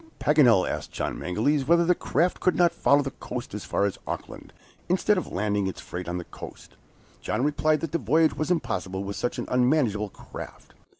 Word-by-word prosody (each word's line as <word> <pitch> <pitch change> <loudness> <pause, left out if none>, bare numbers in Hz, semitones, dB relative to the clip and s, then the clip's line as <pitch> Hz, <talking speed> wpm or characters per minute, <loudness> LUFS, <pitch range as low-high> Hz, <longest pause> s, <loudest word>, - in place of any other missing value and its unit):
Paganel 125 -10 +5
asked - - -4
John - - -3
Mangles 130 +10 0
whether 170 +1 +5
the 180 +1 +4 0.2
raft 170 +5 +3
could 185 - +2
not 175 -1 +4
follow 145 0 +3
the 135 - -4
coast 125 -3 -7
as 105 - -5
far 100 - +1
as 100 - -3
Auckland, - - -6 0.4
instead 190 +4 +3
of 185 - -3
landing 100 0 0
its 95 - -5
freight 90 -1 -6
on 90 - -2
the 90 - -4
coast. - - -11 0.5
John - - -1
replied 155 +1 +2
that 165 - -3
the 170 - 0
voyage 155 +6 +3
was 155 - -3
impossible 95 - -1
with 100 0 -5
such 120 - -2
an - - -3
unmanageable 125 -5 +2
craft. - - -11
130 Hz, 195 wpm, -26 LUFS, 100-160 Hz, 0.5 s, Paganel